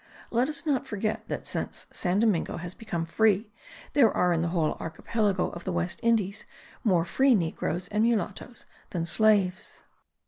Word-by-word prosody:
Let 245 +4 +2
us 305 +2 -3
not 280 -5 0
forget 215 +1 -3
that - - -4
since - - -3
San 180 +1 0
Domingo 210 -6 +1
has 175 +1 -6
become 195 -7 -4
free 210 +4 +2 0.4
there 260 -7 +5
are 180 -1 +2
in 165 - +1
the 170 - 0
whole 165 -3 +1
archipelago 195 +4 -1
of 170 - -8
the 185 - -3
West 175 +3 -2
Indies 220 -4 +1 0.4
more 180 -6 +3
free 260 +8 +4
negroes 175 -1 -2
and 210 +1 +1
mulattos 225 +1 -1 0.2
than 170 -2 -2
slaves. 195 0 +2
200 Hz, 165 wpm, -27 LUFS, 175-225 Hz, 0.4 s, there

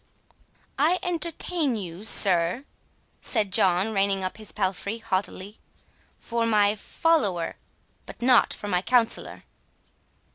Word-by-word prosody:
"I 325 +6 +3
entertained 335 - -1
you, 175 +4 -9
sir," 185 +4 +2 0.6
said 210 -5 0
John, 190 +4 +3
reining 195 -1 +1
up 185 - -4
his 215 -1 -8
palfrey 200 +2 -2
haughtily, 205 -1 -4 0.6
"for 230 -1 -2
my 210 -2 +3
follower, 215 - 0 0.5
but - - -11
not 250 0 +4
for 205 - -4
my 180 -3 0
counsellor." 240 +2 0
210 Hz, 110 wpm, -25 LUFS, 190-245 Hz, 0.6 s, not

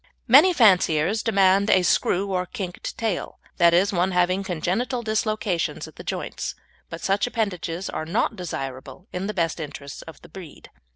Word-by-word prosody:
Many 290 +10 +7
fanciers 195 - +3
demand 195 -1 +3
a 185 - +4
"screw" 195 +2 +1
or 180 -1 -1
"kinked" 180 -2 -6
tail, 220 -5 -3 0.2
that 170 -2 +5
is, 185 +4 +3
one 180 +1 +1
having 180 +2 +2
congenital 195 - -2
dislocations 215 -5 -1
at - - -15
the - - -10
joints, - - -4 0.3
but 165 0 -8
such 200 +4 +1
appendages 190 -7 -3
are 155 - -5
not 195 +7 0
desirable 135 -1 -6
in 180 +2 -3
the 210 - -3
best 170 -2 -1
interests 140 -2 -7
of 160 -3 -12
the - - -14
breed. 180 -6 -12
185 Hz, 165 wpm, -24 LUFS, 170-210 Hz, 0.3 s, Many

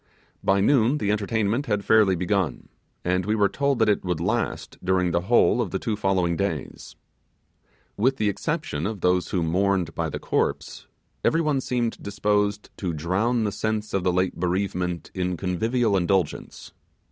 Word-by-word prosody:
By 95 0 +3
noon 130 +4 +3
the 105 -8 0
entertainment 110 +4 0
had 105 -2 -1
fairly 105 -4 +5
begun 90 -5 -1 0.4
and 90 +1 +1
we 105 +3 0
were 105 -2 +3
told 140 +6 0
that 110 -1 +3
it 105 - +2
would 90 -4 -2
last 110 +8 -2
during 90 -1 +1
the 85 +1 +1
whole 120 +5 +3
of 110 - -2
the 95 - -2
two 110 +2 -2
following 95 -4 +1
days. 80 -6 -4 1.0
With 130 +6 +2
the 105 - +1
exception 100 - -2
of 105 -4 -5
those 90 0 +2
who 90 -3 0
mourned 90 0 +1
by 80 -1 -2
the - - -4
corpse, - - -2 0.4
every 165 - +3
one 150 -4 +1
seemed 120 -3 -2
disposed 105 0 -1
to 90 -4 -3
drown 100 +10 0
the 105 - 0
sense 110 0 -2
of 95 - 0
the 90 - +2
late 90 0 0
bereavement 90 -1 -2
in 90 -1 -2
convivial 110 +5 0
indulgence. 95 -2 -1
100 Hz, 170 wpm, -24 LUFS, 90-110 Hz, 1.0 s, fairly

